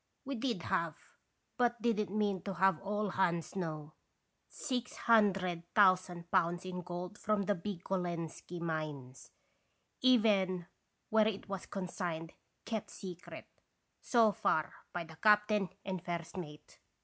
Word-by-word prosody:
We 275 - -3
did 235 -7 -1
have, 165 -2 0 0.6
but 240 -1 +2
did 230 -1 +1
n't 210 - -3
mean 205 -3 +1
to 195 -2 -4
have 190 -2 +4
all 205 +1 -1
hands 170 -3 0
know, 155 -4 -4 0.6
six 250 -3 -3
hundred 195 -6 +3
thousand 185 -3 +4
pounds 175 -1 +2
in 180 -1 -4
gold 180 +3 -6
from 215 -2 +1
the 205 - +2
big 185 0 -5
Golenski 175 -2 -3
mines, 155 -6 -4 0.7
even 205 -8 +4 0.5
where 220 -1 +5
it 210 -2 -3
was 195 -2 -5
consigned 175 -4 -4 0.3
kept 220 -3 -3
secret, 180 -3 -8 0.6
so 230 -4 +4
far, 155 -5 +1 0.2
by 175 - -3
the 160 -1 -13
captain 210 +1 +4 0.2
and 185 -3 -3
first 170 -2 -4
mate. 150 -5 -8
185 Hz, 135 wpm, -34 LUFS, 170-210 Hz, 0.7 s, where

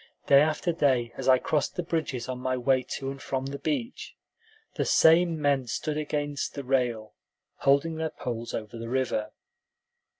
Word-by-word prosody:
Day 140 0 +7
after 155 +3 +1
day, 130 -7 +1
as - - -5
I 130 - +7
crossed 150 +3 -1
the 180 - -2
bridges 155 -7 -2
on 130 -1 -4
my 130 0 -1
way 130 +1 +2 0.2
to 135 0 -4
and 135 - -9
from 135 -1 -3
the 140 +1 -5
beach, 265 -4 -3 0.6
the - - -1
same 165 0 +4
men 140 -3 +1
stood 150 +6 -2
against 145 -1 -3
the 140 - -5
rail, 125 -5 -1 0.4
holding 140 +4 +2
their 160 0 -1
poles 120 -5 -5
over 110 +1 -6
the 115 0 -6
river. 125 -4 -1
135 Hz, 170 wpm, -27 LUFS, 125-155 Hz, 0.6 s, Day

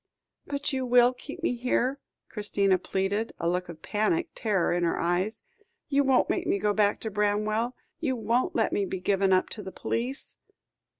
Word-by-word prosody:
"But 285 0 -2
you 260 -1 0
will 245 0 +5
keep 295 +6 -10
me 290 - +2
here?" 250 +2 0 0.3
Christina 200 -3 +1
pleaded, 195 +5 -1
a 170 - -2
look 180 +1 -1
of 160 -2 -10
panic 225 +12 0
terror 200 -7 +1
in 175 0 0
her 170 - +1
eyes. 185 +6 0 0.5
"You 285 0 +3
won't 265 -2 +3
make - - -1
me - - +2
go 205 +1 +1
back 205 -1 +2
to 220 - -4
Bramwell? 210 +4 0 0.2
You 275 -6 0
won't 245 +10 0
let - - +1
me 205 - +1
be 190 - -4
given 195 +1 +2
up 185 0 +4
to 215 - -6
the 190 - -7
police?" 250 +8 -3
215 Hz, 185 wpm, -28 LUFS, 195-250 Hz, 0.5 s, will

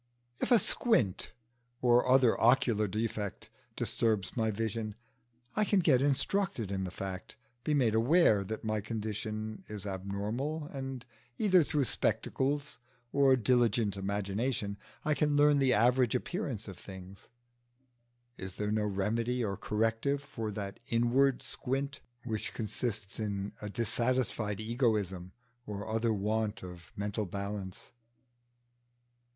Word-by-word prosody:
If - - -1
a 240 - +9
squint 210 - +1 0.5
or 125 0 +4
other 130 -3 +6
ocular 115 -3 +4
defect 105 -1 -3 0.3
disturbs 110 -5 0
my 110 -2 +1
vision, 110 0 -2 0.6
I 215 - +3
can 205 -1 +3
get 145 -8 +4
instructed 145 - 0
in 95 -1 -1
the - - -3
fact, 95 +1 -6 0.3
be 150 - +1
made 120 -6 +3
aware 115 - +4
that 110 +3 -5
my 110 -1 -1
condition 110 0 -4
is 105 -2 -6
abnormal, 105 +11 -3
and 135 -2 -5 0.3
either 190 -4 +5
through 145 -1 +1
spectacles 140 +4 -1 0.3
or 140 -1 +5
diligent 120 -4 +2
imagination 100 +3 -1 0.3
I 150 - +3
can 150 0 +1
learn 145 0 +5
the 130 -2 +4
average 125 +2 +3
appearance 130 - -3
of 95 -3 -9
things: 95 0 -11 1.1
is 95 -1 -6
there 105 +2 -2
no 105 0 +1
remedy 115 +5 0
or 100 -2 -2
corrective 115 +8 0
for 115 -6 -5
that 100 -1 -5
inward 125 +3 +3
squint 140 +2 -3 0.2
which 110 -3 -4
consists 110 -2 -3
in 100 -2 -3
a 105 - -4
dissatisfied 115 -1 0
egoism 110 -6 0 0.3
or 100 -1 -5
other 115 +1 +1
want 110 +1 -1
of 90 -2 -10
mental 105 0 -2
balance? 100 0 -5
110 Hz, 125 wpm, -32 LUFS, 100-130 Hz, 1.1 s, a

